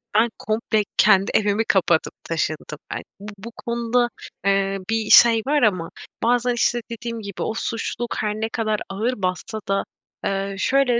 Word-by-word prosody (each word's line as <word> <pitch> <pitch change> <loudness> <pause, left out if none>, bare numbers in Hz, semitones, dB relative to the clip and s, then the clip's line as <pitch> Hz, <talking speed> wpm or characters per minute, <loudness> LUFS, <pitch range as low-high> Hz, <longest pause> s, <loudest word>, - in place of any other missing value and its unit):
ben 225 +3 +4
komple 215 0 0
kendi 195 -2 +5
evimi 210 +1 +2
kapatıp 175 -6 +2
taşındım 155 -2 -3
ben. - - -4 0.2
Bu 205 +1 -8
bu 220 +4 -9
konuda, 235 +1 +1 0.4
eee, 195 0 +2
bir 225 -1 0
şey 230 -1 +8
var 295 +1 +3
ama 185 -7 +2 0.3
bazen, 245 +1 +2
işte, 240 0 +1
dediğim 230 0 -5
gibi 200 -3 -7
o - - -1
suçluluk 230 +1 -3
her 210 -1 -1
ne 220 +1 -2
kadar 215 -2 -1
ağır 215 +6 -1
bassa 185 +4 -2
da, 195 0 +1 0.4
eee, 195 0 -1
şöyle 255 +2 +3
215 Hz, 160 wpm, -22 LUFS, 195-235 Hz, 0.4 s, şey